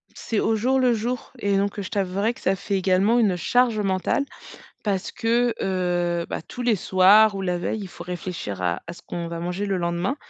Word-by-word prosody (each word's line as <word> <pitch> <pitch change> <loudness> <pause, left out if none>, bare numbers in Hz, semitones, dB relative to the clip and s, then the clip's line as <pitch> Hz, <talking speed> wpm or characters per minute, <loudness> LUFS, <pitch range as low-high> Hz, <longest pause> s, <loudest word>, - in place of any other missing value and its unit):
C'est 225 - -2
au 220 - +2
jour 260 +5 +2
le 250 -2 +4
jour 240 +3 -3
et 200 -3 +1
donc 200 +1 -1
je 195 - -5
t'avouerai 200 +2 0
que - - -16
ça 195 - +2
fait 200 +1 -3
également 195 +5 +3
une 200 -5 +3
charge 235 +4 +2
mentale 195 +7 0 0.6
parce 195 -3 -2
que, 235 +1 +1
heu 175 -2 0
bah, - - -3
tous 245 - -7
les 235 -3 +3
soirs 200 +4 +5
ou 195 - -3
la 180 -1 -1
veille, 215 +4 -2
il 195 - -6
faut 175 - -10
réfléchir 175 - -5
à 85 -1 -1
à 170 - -6
ce - - -15
qu'on 170 -1 -5
va 170 0 -5
manger 180 +4 -3
le 195 -1 0
lendemain 175 +9 -1
195 Hz, 215 wpm, -24 LUFS, 180-225 Hz, 0.6 s, soirs